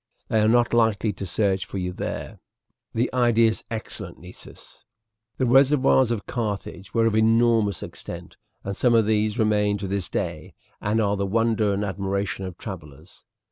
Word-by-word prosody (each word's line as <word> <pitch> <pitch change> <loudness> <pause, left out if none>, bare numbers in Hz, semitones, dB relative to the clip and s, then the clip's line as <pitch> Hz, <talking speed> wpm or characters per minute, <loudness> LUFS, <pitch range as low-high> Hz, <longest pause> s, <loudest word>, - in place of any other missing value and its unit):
They 110 - +2
are 105 - +3
not 120 +1 +3
likely 110 -2 +2
to 95 +1 -6
search 95 0 0
for - - -6
you 90 -1 -3
there." - - -5 0.5
"The 120 +3 -1
idea 120 -2 +4
is 110 - -5
excellent, 115 -2 -5
Nessus." - - -13 0.5
The 130 - +1
reservoirs 130 0 +4
of 115 -4 -2
Carthage 100 -4 -4
were 115 0 +2
of 115 - +2
enormous 110 -1 +3
extent, - - -9 0.3
and 100 0 -4
some 120 +2 +3
of 115 -2 +4
these 105 0 +1
remain 105 -2 +2
to 100 -1 -5
this 95 -2 -3
day - - -4 0.3
and 105 +2 0
are 100 -2 +1
the 100 0 -1
wonder 110 0 +1
and 100 +1 -1
admiration 100 0 -2
of 90 -2 -7
travellers. 80 -5 -10
105 Hz, 170 wpm, -24 LUFS, 100-115 Hz, 0.5 s, idea